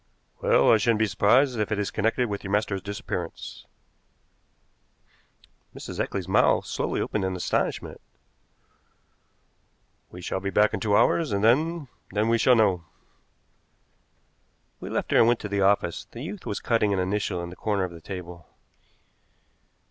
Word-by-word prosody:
"Well, 70 - +4
I 110 - +6
shouldn't 110 +1 +2
be 110 - +2
surprised 115 +5 +3
if 105 0 -1
it 105 - 0
is 100 -1 -2
connected 115 +3 0
with 100 -2 -5
your 95 - -6
master's 100 -1 0
disappearance." 100 -4 -6 2.1
Mrs. - - -8
Eccles's 95 -3 -2
mouth 95 - +3
slowly - - -2
opened 105 - -2
in 95 0 -1
astonishment. 90 - -2 2.1
"We 90 - -11
shall 90 +1 -3
be 100 +1 -3
back 105 +2 +3
in 100 - -1
two 105 0 +2
hours, 155 +7 +2
and 100 0 0
then 155 +6 +2 0.2
then 105 +3 0
we 115 0 +3
shall 125 +1 +5
know." 95 -6 +2 2.0
We - - -7
left - - -3
her - - +4
and 115 - +6
went 120 0 +3
to - - -4
the 100 0 0
office. 95 -3 +1
The 120 - -9
youth 185 +4 -7
was 100 - -3
cutting 115 -3 +1
an 95 - 0
initial 95 0 -1
on 85 0 -6
the - - -10
corner 100 -2 -1
of 90 - -3
the 85 -1 -11
table. 90 -2 -8
105 Hz, 160 wpm, -26 LUFS, 95-115 Hz, 2.1 s, I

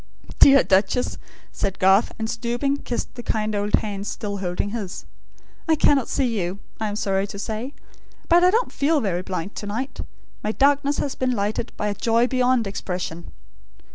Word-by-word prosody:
"Dear 275 -1 +8
Duchess," 195 +6 +1 0.3
said 195 -1 -2
Garth, 190 +3 +4
and 220 -1 -2
stooping, 240 +5 -1
kissed 245 - -4
the 240 - -7
kind 215 -2 -1
old 205 0 +2
hands 205 -1 -3
still 205 -2 -4
holding 190 +1 -2
his; 210 -5 -5 0.6
"I 320 - +5
cannot 280 -4 +3
see 245 -6 0
you, 180 +2 -3 0.2
I 220 - -1
am 205 - -3
sorry 195 -2 0
to 200 - -8
say; 225 +6 -4 0.5
but 345 +1 +5
I 360 - +7
don't 460 +6 +1
feel 300 +2 +2
very 190 -7 -1
blind 185 +1 -4
to 205 - -5
night. 250 +7 -4 0.4
My 215 - -1
darkness 285 +2 +2
has 280 - -1
been 255 -1 0
lightened 210 +1 -2
by 210 - -1
a 205 - 0
joy 230 +3 +2
beyond 255 -2 +2
expression." 180 -3 -5
220 Hz, 175 wpm, -23 LUFS, 200-255 Hz, 0.6 s, Dear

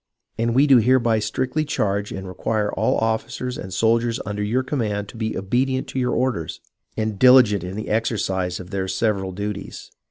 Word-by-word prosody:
And 115 +1 0
we 135 +3 +5
do 135 -3 +6
hereby 120 -1 +3
strictly 130 +8 -1
charge 100 -8 -1
and 95 0 -6
require 105 +3 -1
all - - +1
officers 115 +3 -2
and 95 - -7
soldiers 115 +3 +1
under 105 0 -3
your 115 +6 0
command 105 -7 -2
to - - -12
be 110 -1 -3
obedient 130 +7 0
to 130 - -3
your 125 -1 0
orders, 120 -10 -1 0.4
and 110 -2 -2
diligent 125 -7 +6
in 90 +1 -6
the 110 - -4
exer 110 +1 0
cise 95 -2 -2
of 90 +1 -10
their 95 -2 -2
several 100 -2 -1
duties. 100 +1 -6
110 Hz, 185 wpm, -22 LUFS, 100-125 Hz, 0.4 s, do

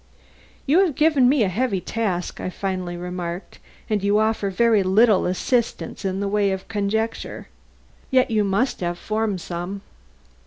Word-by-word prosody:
"You 300 +6 +4
have 360 -8 +2
given 300 -5 +4
me 270 -4 +3
a - - +2
heavy 200 +1 0
task," 185 -3 -3
I - - -3
finally 185 -2 -4
remarked, 180 0 -6 0.3
"and 210 -2 -1
you 200 +1 +3
offer 215 -2 +1
very 220 +2 +3
little 200 +2 +4
assistance 235 +8 -1
in 190 0 -2
the 200 - -1
way 205 0 +2
of 190 0 -4
conjecture. 220 +1 -2 0.6
Yet 255 -2 +3
you 215 -2 +2
must 200 +7 0
have 175 -1 -2
formed 215 -2 -2
some." 175 +4 -5
200 Hz, 155 wpm, -23 LUFS, 185-230 Hz, 0.6 s, You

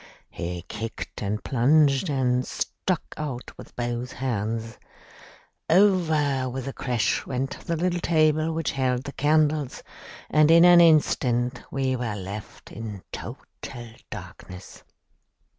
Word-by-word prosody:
He 85 0 -5
kicked 110 +4 -6
and 105 +1 -2
plunged 140 +4 +3
and 125 -2 +1
struck 180 +6 -3
out 135 -5 -5
with - - -13
both 120 +1 -3
hands. 115 -2 -3 0.9
Over 160 -8 +3
with 130 +1 -5
a 135 - -4
crash 120 -4 -1
went 135 +1 -3
the 170 - 0
little 175 +1 0
table 155 -1 +2
which 165 -1 -1
held 130 -2 0
the 140 - -6
candles, 150 -1 +1 0.4
and 155 0 +4
in 170 +1 +8
an 175 -1 +8
instant 125 -6 +3
we 130 -1 0
were 120 -4 -3
left 100 +2 -8
in 105 -3 -7
total - - -7 0.6
darkness. 90 +1 -10
135 Hz, 125 wpm, -25 LUFS, 120-155 Hz, 0.9 s, in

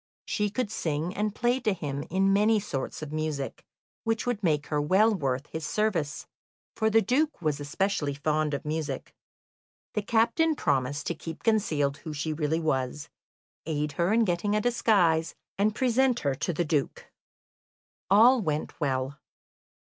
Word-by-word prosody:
She 210 0 0
could 215 0 -2
sing 160 -2 -2
and 210 +1 -2
play 245 +1 +1
to 220 -5 +1
him 145 -5 -4
in 195 +2 +2
many 210 +2 +4
sorts 150 -6 -4
of 150 - -7
music, 155 -3 -3 0.4
which 225 0 -1
would 245 -4 -1
make 150 -4 +1
her 150 -1 -1
well 195 +9 +4
worth 135 -6 -1
his 160 - -4
service, 165 -2 -1 0.5
for 220 -1 +2
the 225 0 +4
Duke 290 +8 +1
was 155 -4 -1
especially 145 0 -1
fond 150 0 0
of 140 - -6
music. 150 -3 -3 0.8
The 210 - 0
captain 235 +10 +2
promised 140 - 0
to - - -1
keep 165 0 -8
concealed 155 -11 +1
who 155 +1 -7
she 155 +2 -2
really 155 +1 0
was, 150 -1 -2 0.6
aid 150 -1 -1
her 170 +6 0
in 225 +1 +4
getting 190 +3 0
a - - +3
disguise, 195 -9 +2 0.2
and 210 +1 +2
present 255 0 +2
her 140 -2 +1
to 145 +6 -2
the 170 +1 -1
Duke. 150 -3 -1 1.0
All 235 +5 +6
went 155 -5 -3
well. 135 -1 -1
165 Hz, 160 wpm, -28 LUFS, 150-215 Hz, 1.0 s, All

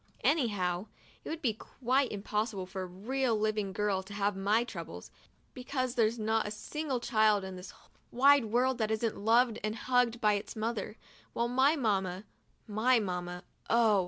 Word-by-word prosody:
Anyhow, 205 - +1 0.4
it - - -7
would 325 0 -5
be 235 -4 +2
quite 255 +4 -1
impossible 210 -1 -2
for 190 +1 -6
a - - -3
real 235 +7 -1
live 215 0 0
little 200 -2 -1
girl 200 -1 0
to 200 +2 -10
have 205 0 0
my 205 +4 +2
troubles, 240 - -8 0.4
because 255 -1 -3
there's 230 -2 +2
not 220 0 0
a - - -3
single 260 +6 -3
child 215 -3 +3
in 190 -1 -6
this 180 +1 -9 0.4
wide 275 +1 +5
world 245 +3 +1
that 215 -1 0
isn't 220 0 0
loved 230 +2 +3
and 215 0 -1
hugged 245 0 +1
by 210 -2 +3
its 205 +3 -4
mother, 220 0 -3 0.4
while 235 - 0
my 260 +5 +3
mamma 195 - 0 0.3
— - - -39
my 250 +1 +5
mamma 180 -3 -4 0.2
— - - -27
oh 225 -3 +4
220 Hz, 180 wpm, -31 LUFS, 205-245 Hz, 0.4 s, wide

